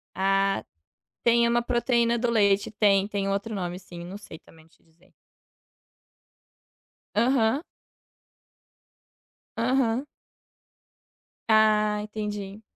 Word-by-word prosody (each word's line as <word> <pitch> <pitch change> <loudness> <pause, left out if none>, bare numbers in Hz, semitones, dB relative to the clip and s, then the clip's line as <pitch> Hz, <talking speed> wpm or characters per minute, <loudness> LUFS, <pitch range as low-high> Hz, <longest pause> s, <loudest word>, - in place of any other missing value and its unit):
Ah, 195 - +1 0.6
tem 235 0 +4
uma 235 0 +2
proteína 235 -1 +1
do 240 0 0
leite. 200 -3 +2
Tem, 200 -2 +3
tem 200 -1 -3
outro 200 +3 -2
nome 180 -2 -4
sim, 175 -2 -11
eu 170 - -8
não 195 +3 -8
sei 165 -6 -12
também 160 -1 -20
te 165 - -30
dizer. 170 +3 -29 2.0
Aham. 250 +1 +2 2.0
Aham. 250 +1 +1 1.4
Ah, 215 -1 +3
entendi. 210 -1 -6
210 Hz, 100 wpm, -26 LUFS, 195-235 Hz, 2.0 s, tem